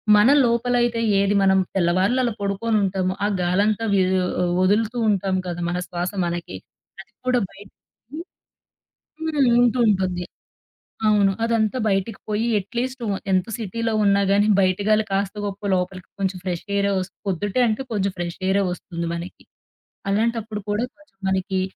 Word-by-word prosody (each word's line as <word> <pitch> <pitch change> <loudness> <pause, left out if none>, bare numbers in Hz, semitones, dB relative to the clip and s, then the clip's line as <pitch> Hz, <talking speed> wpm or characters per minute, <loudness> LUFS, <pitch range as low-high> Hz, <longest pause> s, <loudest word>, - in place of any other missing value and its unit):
మన 210 +2 +6 0.2
లోపలయితే 240 0 +1 0.2
ఏది 200 +1 +2
మనం 190 0 +4 0.2
తెల్లవారులలా 190 +7 +2
అలా 235 - -1
పడుకొని 200 +3 0
ఉంటాము, 185 -1 0
ఆ - - +3 0.2
గాలంతా 205 +5 +1
వీ 195 - +4 0.6
వదులుతూ 215 +5 +2
ఉంటాం 195 -1 +1
కదా! 175 0 -4
మన 175 - -2
శ్వాస 175 +2 -3
మనకి 170 - -4 0.5
అది 195 - -20 0.2
కూడా 250 -1 +3
బయిట్ 195 0 -15 0.4
హ్మ్, 325 +3 -6 1.2
హ్మ్. 250 - +5
ఉంటూ 245 +1 +2
ఉంటుంది. 185 -3 +1 0.9
అవును. 200 -2 +4
అదంతా 230 +1 +1
బయటికి 195 +2 -1
పోయి 215 +2 0
అట్లీస్ట్ 245 +6 -4
వ 200 - 0 0.2
ఎంత 185 +4 +1
సిటీలో 225 +2 -2
ఉన్నా 200 0 +4
గానీ, 205 +1 +4
బయటగా 200 +3 +2 0.2
కాస్త 195 +1 0
గొప్పో 200 0 -5
లోపలికి 185 0 -3
కొంచెం 190 -1 -1
ఫ్రెష్ 175 -2 -3
ఎయిర్ 200 0 +2
ఓస్ 185 0 -2 0.2
పొద్దుటే 200 +5 -1
అంటే 220 +5 -1
కొంచెం 200 -2 0
ఫ్రెష్ 175 -1 -4
ఎయిరే 195 +1 +2
ఒస్తుంది 170 -1 -5
మనకి. 170 +2 -8 0.7
అలాంటప్పుడు 220 0 -1
కూడా 210 +3 0
కొంచెం 300 -7 -25
మనకి 190 0 0
200 Hz, 145 wpm, -22 LUFS, 185-225 Hz, 1.2 s, మన